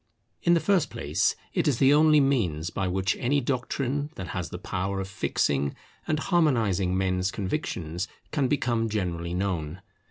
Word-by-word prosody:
In 175 0 +4
the - - +4
first 190 -2 +2
place, - - 0 0.2
it - - +1
is 140 -5 +2
the 135 +3 +5
only 155 0 +6
means 95 - +1
by 95 - -1
which 95 +2 0
any 140 +4 +2
doctrine 135 +2 -2
that 90 - -6
has - - -3
the - - -6
power 95 +1 -3
of 95 - -3
fixing 70 -7 0 0.3
and 155 - +1
harmonizing 115 - +2
men's 95 0 +1
convictions 90 -3 -3 0.2
can 145 -3 +1
become 120 -5 0
generally 85 -5 -2
known. 90 -3 -2
100 Hz, 160 wpm, -27 LUFS, 90-140 Hz, 0.3 s, only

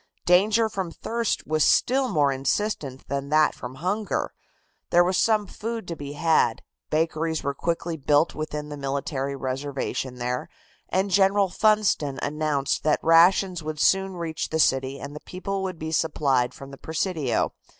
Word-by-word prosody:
Danger 210 +6 +4
from 190 -4 -4
thirst 230 +6 -2
was 155 -1 +1
still 265 +1 +3
more 145 -6 +2
insistent 135 0 -2
than 140 0 -3
that 155 0 +4
from 125 +1 -8
hunger. 195 +8 -2 0.6
There 175 0 +5
was 185 +1 0
some 215 +1 +2
food 225 +1 -5
to 170 - -3
be 145 -2 -7
had, 160 +2 +2 0.3
bakeries 160 0 0
were 140 - -1
quickly 165 +2 -2
built 145 +2 +2
within 150 -1 -5
the 145 - -6
military 140 0 -3
reservation 135 -1 -3
there, 125 0 -3 0.4
and 190 +1 0
General 195 +1 +4
Funston 210 -11 +2
announced 145 -1 -1
that 155 -1 +2
rations 175 +2 +4
would 155 -1 -5
soon 190 +2 +2
reach 165 -2 -4
the 160 - -1
city 135 -2 +1
and 145 - -8
the - - -6
people 195 +3 -5
would 185 -2 -4
be 160 0 -5
supplied 140 -6 +1
from 135 0 -10
the 135 - -11
Presidio. 160 - -1
160 Hz, 160 wpm, -25 LUFS, 140-190 Hz, 0.6 s, There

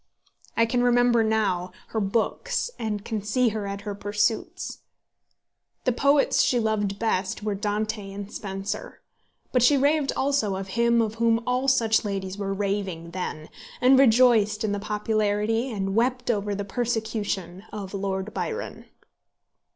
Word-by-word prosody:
I 230 - +5
can 245 +2 0
remember 245 -1 +4
now 200 -5 0 0.2
her 220 - -1
books, 230 - -1
and 210 -3 -3
can 220 -2 -2
see 230 +4 +2
her 210 -2 -4
at 200 0 -5
her 205 -1 -4
pursuits. 205 +2 -2 1.0
The 255 - +2
poets 280 +4 +3
she 245 - +2
loved 210 -3 0
best 200 -3 -1
were 210 -1 -1
Dante 210 0 -2
and 200 +1 -7
Spenser. 195 0 -5 0.5
But 250 - +3
she 275 +4 +5
raved 285 +1 +2
also 265 -8 +1
of 190 0 -5
him 235 +2 +3
of 220 0 -3
whom 230 0 +3
all 250 +2 0
such 230 -5 +3
ladies 195 -2 -3
were 195 -1 -2
raving 195 -4 -2
then, 165 -4 -5 0.3
and 260 +1 +6
rejoiced 225 -4 +5
in 215 - 0
the 205 - -1
popularity 215 +2 0
and 195 -4 -2
wept 245 +2 +1
over 205 -2 -1
the 200 0 -4
persecution 215 -4 -2
of 200 -2 -6
Lord 195 +1 -3
Byron. 460 +1 -4
215 Hz, 150 wpm, -25 LUFS, 200-235 Hz, 1.0 s, and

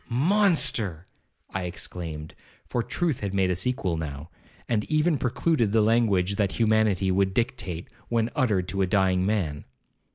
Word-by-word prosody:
'Monster!' 130 - +1 0.5
I 95 -1 -3
exclaimed, 80 -3 -6 0.3
for 120 - -1
truth 160 +2 -1
had 100 -2 -3
made 95 -1 +2
us 90 +6 -1
equal 95 -10 -1
now, 75 +1 -6 0.4
and 110 -3 +1
even 155 -1 +1
precluded 125 -3 +1
the 110 -1 +4
language 100 -4 +2
that 100 -3 +1
humanity 110 -4 +2
would 95 0 +1
dictate 115 -8 -2 0.2
when 115 0 +1
uttered 105 -9 +1
to 100 - -1
a 95 - +2
dying 95 -1 +2
man. 85 -9 -1
100 Hz, 150 wpm, -26 LUFS, 90-120 Hz, 0.5 s, the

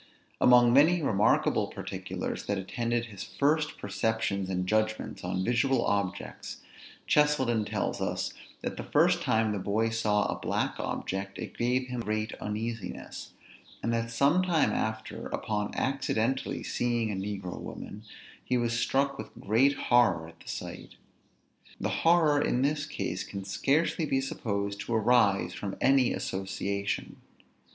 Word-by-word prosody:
Among 120 -1 +7
many 160 +5 +5
remarkable 105 -5 +3
particulars - - -5
that 100 - 0
attended 120 +5 -1
his 100 -5 -8
first 150 +2 0
perceptions 100 -2 -1
and 90 -1 -1
judgments 110 +2 -1
on 95 0 -1
visual 125 +3 +2
objects, 100 -1 -2 0.5
Cheselden 130 -7 +3
tells - - -2
us, - - -2 0.3
that - - -3
the - - -4
first - - +3
time 110 -1 +2
the 105 - -2
boy 110 +4 +1
saw 110 -2 +1
a - - -2
black - - -1
object, 95 +1 -3
it - - -7
gave 125 +2 +1
him 125 -1 -4
great 110 -1 -2
uneasiness; 105 -1 -5 0.5
and 115 - 0
that 115 0 -1
some 140 +9 +3
time 175 -4 +2
after, 110 0 -3
upon 105 -1 -2
accidentally 130 -1 -1
seeing 120 -2 0
a - - -2
negro 95 -2 -4
woman, 105 - -8 0.4
he 125 - +1
was 120 -1 0
struck 140 +2 +1
with - - -6
great 120 +7 +3
horror 120 -12 +3
at 85 - -15
the - - -12
sight. - - -7 0.8
The - - -1
horror, 160 -3 +4
in 125 -2 +1
this 150 +1 0
case, 90 -9 -3
can 100 -1 -6
scarcely 150 - +1
be 135 - +2
supposed 100 -6 -3
to 115 +4 -2
arise 105 -5 +3
from 100 -2 -5
any 135 -2 +4
association. 100 +1 -3
115 Hz, 145 wpm, -29 LUFS, 100-130 Hz, 0.8 s, Among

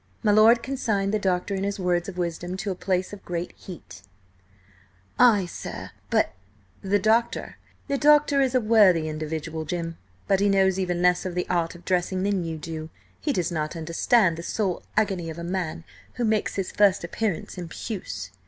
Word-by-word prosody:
My 210 - +4
lord 225 +3 +6
consigned 215 -7 -1
the 215 - +2
doctor 190 0 0
and 195 0 -2
his 200 0 -2
words 175 0 0
of 185 - -9
wisdom 175 +1 -3
to 195 +1 -3
a - - -3
place 185 +1 -1
of 205 - -9
great 175 0 -4
heat. 170 - -11 1.2
"Ay, 220 -6 +6
sir, 175 - -7 0.2
but—" - - +2 0.5
"The 195 +1 +2
doctor 275 +6 +2
is 260 -1 +1
a - - +5
worthy 205 -8 +4
individual, 155 +1 -4
Jim, 165 0 -4 0.3
but 195 - +3
he 200 0 +3
knows 190 -1 +3
even 180 -2 -1
less 180 0 +3
of 185 -2 -4
the 180 - -1
art 170 -1 0
of 175 - -14
dressing 185 0 0
than 200 -2 0
you 165 -1 -4
do. 155 0 -6 0.3
He 300 - -1
does 180 -8 -1
not 155 -1 -2
understand 170 +3 +2
the - - -5
soul 190 +1 -2 0.2
agony 195 -6 +1
of 160 - -7
a 170 - -6
man 170 -2 -3 0.3
who 245 - -1
makes 215 -1 0
his 195 -2 -2
first 200 -3 +3
appearance 190 0 -3
in 175 - -5
puce." 165 - -6
185 Hz, 180 wpm, -25 LUFS, 170-205 Hz, 1.2 s, lord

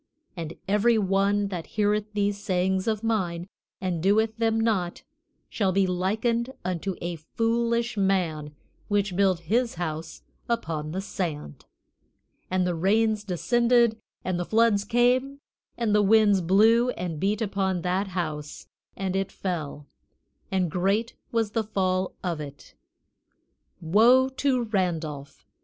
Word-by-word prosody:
And 165 -2 -6
every 210 +4 +3
one 200 0 +1
that 175 -4 -5
heareth 210 0 +1
these 205 -1 0
sayings 185 +1 0
of 215 -1 -1
mine, 180 -7 -1 0.3
and 180 -3 -2
doeth 215 +4 +2
them 225 -1 +1
not, 200 -6 -1 0.4
shall 195 -4 0
be 195 +1 +2
likened 220 +7 0
unto 185 +1 -2
a 175 -1 -3
foolish 235 +6 -1
man 170 -7 0 0.3
which 200 -3 0
built 190 -3 +2
his 230 +7 0
house 160 -1 -5 0.3
upon 160 -10 -2
the 190 +3 -3
sand; 160 - -5 0.8
and 185 0 +1
the 180 - 0
rains 210 +5 +1
descended, 235 +4 +2 0.3
and 185 -1 -1
the - - 0
floods 220 -1 +3
came, 250 +4 +2 0.4
and 230 -3 0
the 210 - +5
winds 205 -1 +4
blew 220 +7 +4
and 175 -9 -4
beat 200 +4 0
upon 190 -5 -1
that 185 +2 0
house 155 -5 -5 0.3
and 190 -1 -2
it 195 0 -1
fell, 155 -6 -4 0.7
and 185 -4 0
great 200 +7 0 0.2
was 225 -3 0
the 225 0 0
fall 185 -3 -1
of 170 -4 -2
it." 145 -1 -10 1.1
Woe 230 +10 +5
to 265 -1 0
Randolph! 165 -9 -3
195 Hz, 135 wpm, -26 LUFS, 175-225 Hz, 1.1 s, the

